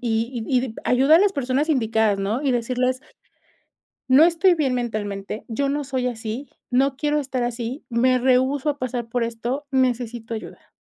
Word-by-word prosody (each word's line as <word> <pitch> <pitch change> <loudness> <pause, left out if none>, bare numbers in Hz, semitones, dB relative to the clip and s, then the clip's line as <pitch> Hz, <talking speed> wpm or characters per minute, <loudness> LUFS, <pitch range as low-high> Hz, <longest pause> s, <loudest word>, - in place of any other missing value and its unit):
y 235 +2 0
y 225 - -9
ayuda 270 +5 +5
a - - +6
las 405 0 +3
personas 275 +1 -1
indicadas, 220 -7 +2
¿no? 215 +8 -1
Y 275 - +1
decirles 255 +2 0 1.1
no 270 +5 +7
estoy 345 +2 +4
bien 275 -5 0
mentalmente, 215 -4 -4
yo 275 +5 -1
no 290 +1 -1
soy 260 -2 -2
así, 235 +3 -5 0.2
no 265 +2 +2
quiero 295 +2 0
estar 260 -3 -2
así, 240 +3 -4
me 255 +2 +3
rehúso 260 +3 +2
a 290 - -2
pasar 245 -2 -3
por 235 0 0
esto, 240 +5 -4
necesito 245 -3 -1
ayuda. 220 - -9
250 Hz, 165 wpm, -23 LUFS, 230-275 Hz, 1.1 s, no